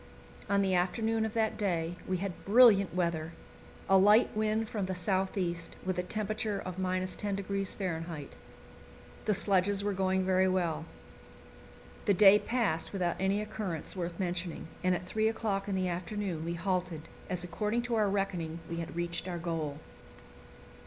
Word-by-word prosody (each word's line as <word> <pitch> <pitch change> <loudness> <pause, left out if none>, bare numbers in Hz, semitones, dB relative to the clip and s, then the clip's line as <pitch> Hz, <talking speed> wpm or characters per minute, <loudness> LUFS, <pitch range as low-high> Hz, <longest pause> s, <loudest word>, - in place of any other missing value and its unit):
On 200 0 +3
the 190 -1 +1
afternoon 220 +5 +1
of 220 - -5
that 220 -1 0
day 175 -4 0
we 185 - 0
had 190 -1 -5
brilliant 200 -5 +6
weather 170 -2 -1 0.5
a 195 0 +6
light 210 +4 +5
wind 215 +1 +1
from 205 -4 -3
the 185 - -2
south 190 +2 0
east 170 -3 -2
with 185 -1 -1
a - - +3
temperature 215 +2 -2
of 185 -2 -6
10° 195 +1 -2
F. 165 -5 -3 1.0
The 215 - +3
sledges 195 +1 +2
were 205 0 0
going 190 0 +1
very 190 0 +3
well. 170 -4 0 1.2
The 200 - +4
day 200 +2 +8
passed 215 -11 -1
without 180 -3 0
any 195 +2 +1
occurrence 195 -7 -4
worth 170 -2 -4
mentioning, 175 -3 -3 0.2
and 185 0 +3
at 180 - -5
three 215 +4 +1
o'clock 215 -3 -1
in 200 - -1
the 185 -1 0
afternoon 180 -1 -3
we 170 +1 -2
halted, 175 -3 -2 0.2
as 180 -1 -2
according 210 +7 -1
to 245 -1 -3
our 215 -3 +3
reckoning 180 -5 -2
we 170 - -4
had 165 -1 -5
reached 170 +1 -2
our 175 -1 -3
goal. 165 -4 -3
185 Hz, 160 wpm, -31 LUFS, 175-205 Hz, 1.2 s, day